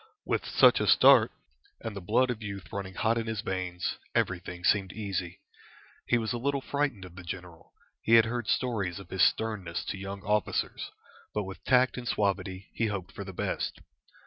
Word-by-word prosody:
With - - -1
such - - +6
a - - 0
start, - - +7 0.5
and 110 -3 -6
the 100 - -5
blood 120 +7 +2
of 115 -2 -5
youth 100 -3 -7
running 95 -2 -5
hot 115 0 +2
in 115 - -4
his 110 -2 -2
veins, 90 -2 -3 0.2
everything 90 -1 -1
seemed 95 -1 +3
easy. 95 -4 -4 0.7
He 120 - +4
was 115 +1 -1
a 120 - -2
little 140 +3 0
frightened 140 -9 -1
of 90 -1 -12
the 95 - -9
general; 85 -1 -8 0.3
he 115 - +5
had 115 0 +7
heard 120 -1 -3
stories 100 -8 0
of 95 - -11
his 95 - -1
sternness 105 -7 +1
to 100 - -4
young 100 0 -6
officers, 105 0 -1 0.5
but 105 - +1
with 95 0 -9
tact 125 0 +4
and 120 - -7
suavity 100 -2 -1
he 115 - 0
hoped 100 -2 -4
for 100 - -7
the 95 - -7
best. 90 - -3
100 Hz, 190 wpm, -29 LUFS, 95-115 Hz, 0.7 s, start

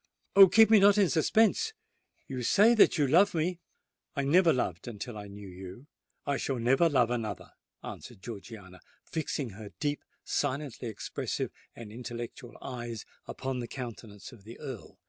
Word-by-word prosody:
Oh! 195 -1 +10
keep 220 +3 +6
me 220 - +8
not 200 +1 +6
in 200 -4 +4
suspense! 220 - +2 0.5
You 130 -2 -4
say 205 - +5
that 220 -5 +5
you 145 - +3
love 175 +8 +4
me——" 170 +2 -1 0.6
"I 140 - 0
never 165 +5 +5
loved 90 - -2
until 115 +1 -6
I 105 -1 -7
knew 100 0 -10
you—I 95 - -8
shall 135 - -2
never 135 +8 +3
love 125 -5 +2
another," 110 -5 -4 0.3
answered - - -9
Georgiana, 100 -4 -9 0.2
fixing 150 -6 -3
her 105 +1 -10
deep, 145 -1 -1 0.2
silently 140 -3 -2
expressive, 110 - -4 0.2
and 115 -3 -9
intellectual 120 +1 -8
eyes 120 -4 -6 0.2
upon 130 -1 -4
the 120 - -4
countenance 115 -5 -8
of 115 -6 -15
the 115 +3 -11
Earl. 130 -7 -8
125 Hz, 155 wpm, -30 LUFS, 110-160 Hz, 0.6 s, Oh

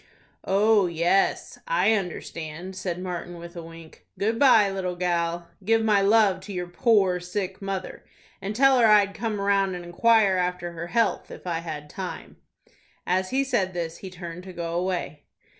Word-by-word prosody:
"Oh, 205 0 +3
yes, 170 +3 +1
I - - +3
understand," 175 -2 -5
said 180 -2 -3
Martin, 175 -1 -5
with 170 +1 -10
a 170 - -6
wink. 165 -1 -13
"Good 225 +3 0
by, 235 -7 +6
little 185 -2 -3
gal. 170 -1 -1 0.2
Give 225 +3 +2
my 210 -2 +3
love 200 -2 +4
to 190 +2 -10
your 180 -2 -3
poor 185 0 +2
sick 185 +2 -4
mother, 195 -1 -5 0.4
and 200 +2 -4
tell 265 +1 +5
her 230 - +6
I'd 205 -2 +5
come 220 -2 -3
round 200 -1 +1
and 175 -1 -7
inquire 200 +2 +3
after 180 -1 -2
her 170 0 -6
health 230 +6 0
if - - -11
I 170 -2 -1
had 155 -3 -6
time." 185 +4 -7 0.7
As 185 +1 0
he 270 +1 +1
said 200 -9 -1
this 165 -1 -3
he 190 - -8
turned 175 -1 -8
to 185 - -9
go 170 -1 -4
away. 175 -4 -3
185 Hz, 175 wpm, -25 LUFS, 175-205 Hz, 0.7 s, by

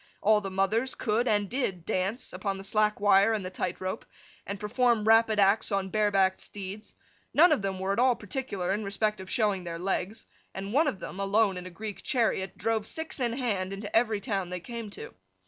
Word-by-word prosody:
All 215 +1 +4
the 195 - -4
mothers 200 +7 0
could 235 +2 0
(and 205 -2 +2
did) 195 -8 -2
dance, 195 +7 -2
upon 195 -2 -2
the 195 - -8
slack 210 +1 +1
wire 200 +1 +5
and 210 -4 -2
the 185 - -5
tight 185 -1 -3
rope, 185 0 -4 0.4
and 200 0 -4
perform 230 +1 +2
rapid 225 -1 +5
acts 200 +3 +3
on 195 -1 0
bare 210 +1 +2
backed 190 -1 +2
steeds; 200 +1 -8 0.4
none 340 +4 +7
of 295 - +3
them 195 -1 -2
were 190 +1 0
at 200 - -1
all 250 0 +4
particular 200 -5 -3
in 210 +2 -2
respect 210 +1 -1
of 190 - -10
showing 210 -7 +1
their 170 -1 -5
legs; 195 +4 -2 0.3
and 195 +2 -5
one 305 +4 +4
of 240 - -1
them, 190 - -7
alone 200 0 +2
in 180 0 -6
a - - -7
Greek 205 +3 -7
chariot, 220 -8 0
drove 220 +1 0
six 320 -2 -4
in 240 -2 0
hand 210 -7 -1
into 200 +1 -6
every 225 -2 +3
town 195 -5 -2
they 180 0 -4
came 230 +3 -7
to. 445 - -9
205 Hz, 215 wpm, -28 LUFS, 195-225 Hz, 0.4 s, none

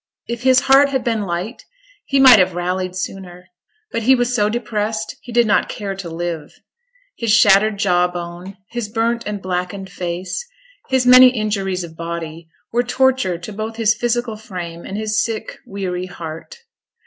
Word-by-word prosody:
If 235 0 -5
his 260 0 +4
heart 275 +1 +5
had 265 -2 -1
been 225 -3 0
light, 180 +7 -4 0.4
he 275 - +1
might 260 -5 +9
have 185 -1 +2
rallied 180 +1 -2
sooner; 180 -1 -7 0.4
but - - -2
he 260 +4 +5
was 245 0 0
so 210 -3 +2
depressed 215 -1 -3
he 245 - -11
did 240 0 +3
not 210 - +2
care 200 -2 -4
to 185 -3 -6
live. 165 -2 -5 0.6
His 230 -2 -1
shattered 210 -1 +5
jaw 180 -3 +2
bone, 175 +2 -8
his 235 -3 -4
burnt 230 +1 -1
and 210 -1 -3
blackened 185 +1 -4
face, 180 - -4 0.5
his 260 -1 +2
many 255 +1 +9
injuries 205 -6 -1
of 165 -1 -10
body, 165 -1 -6 0.2
were 240 - +3
torture 250 -6 +1
to 175 +5 -8
both 220 +2 -5
his 220 -2 +3
physical 240 -1 -1
frame, 175 -5 -7
and 195 - -5
his 215 0 0
sick, 225 -1 -5
weary 185 -2 -4
heart. 165 - -8
205 Hz, 170 wpm, -19 LUFS, 180-235 Hz, 0.6 s, might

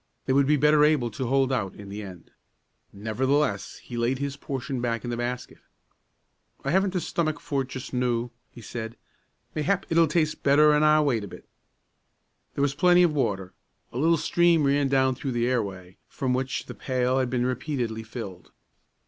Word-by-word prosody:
They 130 - +1
would 140 0 +4
be 150 +1 +4
better 150 +1 +5
able 150 -6 +3
to 125 +4 -4
hold 135 +1 +2
out 100 -7 -2
in 100 -1 -10
the 105 +2 -6
end. 90 -4 -11 0.6
Nevertheless, 110 +2 -1
he 120 - -7
laid 120 +3 +1
his 140 0 -3
portion 135 -2 -4
back 115 -2 -1
in 120 - -4
the - - -1
basket. 120 +1 -4 1.1
"I 140 - 0
haven't 190 +1 +2
the 185 - +1
stomach 155 -3 -1
for 140 -2 -1
it 130 - -5
just 130 0 -8
noo," 120 -1 0 0.2
he 120 - -13
said. 115 +1 -6 0.6
"Mayhap 185 +6 0
it'll 165 0 +5
taste 155 0 0
better 150 +2 +5
an' 150 - +3
I 155 0 +5
wait 125 -8 +1
a - - -6
bit." - - -12 1.1
There 140 - 0
was 140 -1 +1
plenty 180 +4 +5
of 170 -3 +3
water. 95 -10 -1 0.4
A 120 - -3
little 165 +3 +4
stream 170 0 +3
ran 140 0 +2
down 130 -1 +3
through 130 0 -4
the 120 0 +1
airway, 95 -7 -3
from 130 -2 -2
which 130 0 -2
the - - -8
pail 130 0 0
had 130 -1 0
been 125 -1 0
repeatedly 125 -3 -2
filled. 110 -6 -8
130 Hz, 190 wpm, -26 LUFS, 120-150 Hz, 1.1 s, better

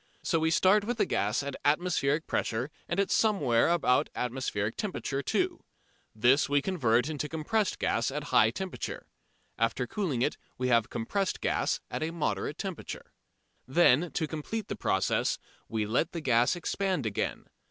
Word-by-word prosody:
So 165 - +1
we 160 0 +2
start 190 +5 +4
with 235 +2 -2
the - - +3
gas 105 +7 0
at 140 -1 -4
atmospheric 155 -1 +1
pressure 120 +6 -1 0.2
and 170 - -1
at 200 - +1
somewhere 150 - +3
about 165 -7 +2
atmospheric 115 -4 -2
temperature 160 -9 -3
too. - - -1 0.5
This 125 +6 +4
we 145 0 +4
convert 130 -7 +1
into 150 -1 -3
compressed 180 +6 0
gas 115 - 0
at 145 +2 -4
a - - -9
high 110 - +4
temperature. 185 +10 -5 0.5
After 115 +2 +1
cooling 140 - -1
it - - 0 0.2
we 125 0 -1
have 115 -3 +3
compressed 195 - -2
gas - - 0
at - - -3
a 155 - 0
moderate 160 -2 -2
temperature. 190 -4 -6 0.6
Then, 165 +2 +4
to 160 - 0
complete 165 +8 -5
the - - -2
process, 95 - +1 0.3
we 110 -2 -1
let 120 +9 0
the 170 - -4
gas 125 +1 +3
expand 180 -3 -1
again. 105 -2 -2
145 Hz, 165 wpm, -29 LUFS, 125-175 Hz, 0.6 s, start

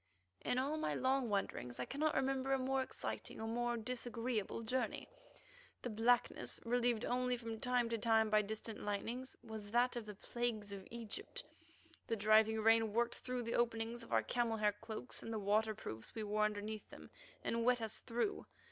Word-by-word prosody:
In 250 - +1
all 280 +4 +1
my 315 - 0
long 260 -1 +2
wanderings 130 -11 -1
I 125 - -1
cannot 305 +2 0
remember 270 0 +1
a - - +4
more 265 +1 +1
exciting 260 - -4
or - - -3
a - - -2
more 240 +1 0
disagreeable 230 -2 -2
journey. 250 +3 -1 0.8
The 245 - -2
blackness, 230 +3 +2
relieved 240 -1 +2
only 250 0 +1
from 230 -2 -5
time 250 -1 +2
to 230 -1 -1
time 220 0 +4
by 215 0 +6
distant 215 +1 -4
lightnings, 230 +5 -3
was 220 -3 -7
that 245 +3 +3
of 235 -3 -4
the 210 - -6
plagues 215 -1 -2
of 195 -1 -7
Egypt; 235 - -6 0.6
the 230 - +1
driving 220 +1 +5
rain 225 -1 +5
worked 235 +1 +1
through 250 -1 -2
the 230 - -2
openings 230 0 0
of 230 - -11
our - - +4
camel 235 -2 +1
hair 210 -1 +3
cloaks 220 +3 -5
and 225 - -5
the 225 - -1
waterproofs 210 - 0
we 220 - -2
wore 210 0 +2
underneath 215 0 -3
them, - - -12 0.3
and 230 0 0
wet 250 +1 +4
us 225 -2 -3
through. 240 - -1
230 Hz, 185 wpm, -38 LUFS, 215-245 Hz, 0.8 s, by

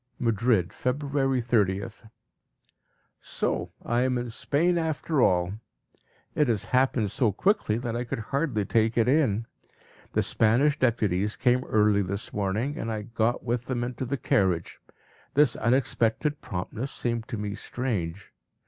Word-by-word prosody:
Madrid, 115 -5 +1
February 135 0 0
30th. 110 -1 -1 1.1
So - - -2
I 120 +1 +1
am 130 0 +1
in 120 -1 -4
Spain 170 +9 +1
after 160 -2 0
all! 90 -2 +3 0.8
It 150 - +2
has 105 -4 0
happened 125 -5 +2
so 115 -5 +2
quickly 190 - +1
that 120 -1 -3
I 120 - -1
could 120 - -4 0.2
hardly 135 -8 0
take 110 +2 +1
it 115 -1 +3
in. 125 -6 +2 0.7
The - - +2
Spanish 135 +7 +2
deputies 105 -5 +1
came 125 0 +2
early 105 -1 +3
this 100 +2 -4
morning, 105 +8 -1
and 115 - -3
I 110 -1 -3
got 115 +2 -1
with 120 0 -2
them 120 -2 -2
into 125 +1 -4
the 140 +3 -2
carriage. 95 -8 0 0.6
This 145 -3 +4
unexpected 125 +3 +1
promptness 115 +3 -4
seemed 115 -3 -2
to 115 - -4
me 105 -1 -3
strange. 100 -8 -4
115 Hz, 140 wpm, -27 LUFS, 105-130 Hz, 1.1 s, This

